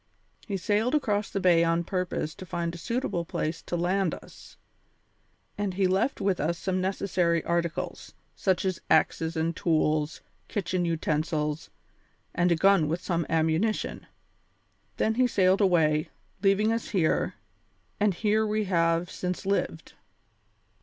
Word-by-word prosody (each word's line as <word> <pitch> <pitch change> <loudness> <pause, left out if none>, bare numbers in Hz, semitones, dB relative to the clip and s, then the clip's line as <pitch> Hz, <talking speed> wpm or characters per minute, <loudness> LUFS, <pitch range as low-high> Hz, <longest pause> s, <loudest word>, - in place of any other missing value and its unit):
He 200 -3 -2
sailed 215 - +1
across 210 -8 0
the 195 - -2
bay 175 -3 +4
on 165 +1 +1
purpose 180 -4 -2
to - - -10
find 170 -1 -2
a - - -7
suitable 230 -4 -2
place 165 -1 -3
to 175 - -3
land 180 +1 +1
us, - - -15 1.0
and 200 -3 -1
he 195 0 +2
left 190 +9 +1
with 195 -2 0
us 165 +3 0
some 185 +1 -1
necessary 180 -3 0
articles, 170 +1 -3 0.2
such 190 -1 0
as 185 -2 -1
axes 160 +1 +2
and 165 +1 0
tools, 155 -2 0 0.3
kitchen 185 -4 -1
utensils, 155 -2 -1 0.6
and 175 0 +2
a - - +5
gun 190 -2 +4
with 165 +4 -2
some 170 -3 -1
ammunition. 165 +7 0 0.9
Then 220 - +2
he 250 +2 +3
sailed 190 -3 +3
away, 155 -5 +3 0.3
leaving 200 +2 +3
us 230 - -3
here, 180 -6 +1 0.6
and 205 -3 +2
here 215 +3 +1
we 215 0 0
have 170 -2 +1
since 180 +2 -4
lived. 200 +1 -2
180 Hz, 140 wpm, -27 LUFS, 165-200 Hz, 1.0 s, a